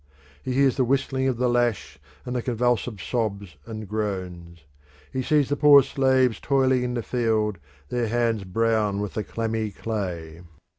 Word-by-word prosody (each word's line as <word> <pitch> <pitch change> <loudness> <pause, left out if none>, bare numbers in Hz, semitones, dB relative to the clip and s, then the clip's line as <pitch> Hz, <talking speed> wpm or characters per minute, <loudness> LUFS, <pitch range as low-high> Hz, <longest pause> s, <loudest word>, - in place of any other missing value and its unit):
He 130 - -3
hears 135 0 +3
the 130 - +3
whistling 130 +1 0
of 130 -3 0
the 125 +1 +1
lash 120 - 0 0.3
and 125 - -4
the 125 - 0
convulsive 120 -2 -1
sobs 100 - -3
and 110 -2 -7
groans. 90 -5 -5 0.5
He 130 - -1
sees 150 0 +2
the 145 - +1
poor 145 -2 +7
slaves 130 -3 +2
toiling 130 -2 +2
in 125 0 -2
the 120 - -2
field, 110 -5 0 0.3
their 120 -2 -1
hands 115 -2 0
brown 105 +1 0
with 105 -1 -4
the 110 - -2
clammy 110 0 -2
clay. 90 -7 -5
115 Hz, 160 wpm, -24 LUFS, 105-125 Hz, 0.5 s, poor